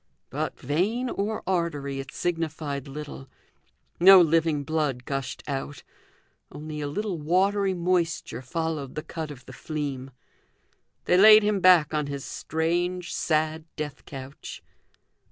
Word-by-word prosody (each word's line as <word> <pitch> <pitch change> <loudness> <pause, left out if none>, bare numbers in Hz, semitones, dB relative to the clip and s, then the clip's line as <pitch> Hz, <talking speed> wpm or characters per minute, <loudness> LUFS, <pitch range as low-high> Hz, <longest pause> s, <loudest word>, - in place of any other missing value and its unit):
But, - - -3
vein 205 - -1
or 215 +2 -2
artery, 150 -7 -1
it 135 - -7
signified 155 -5 -3
little; 140 -1 -8 0.7
no 190 +2 +9
living 160 -3 +2
blood 145 -5 -1
gushed 135 -1 -4
out; 140 0 -4 0.7
only 150 0 -7
a 145 - -2
little 190 +3 -3
watery 190 +5 +1
moisture 170 -6 -1
followed 155 0 -3
the 155 - -4
cut 160 -2 -6
of 130 -4 -11
the - - -11
fleam. 145 -4 -5 1.0
They 180 - +4
laid 215 +2 +9
him 210 -1 +1
back 180 -5 +5
on 150 -1 0
his 140 -1 -5
strange 175 +3 -2
sad 155 0 0
death 150 -2 -6
couch. 135 0 -9
155 Hz, 130 wpm, -26 LUFS, 145-180 Hz, 1.0 s, no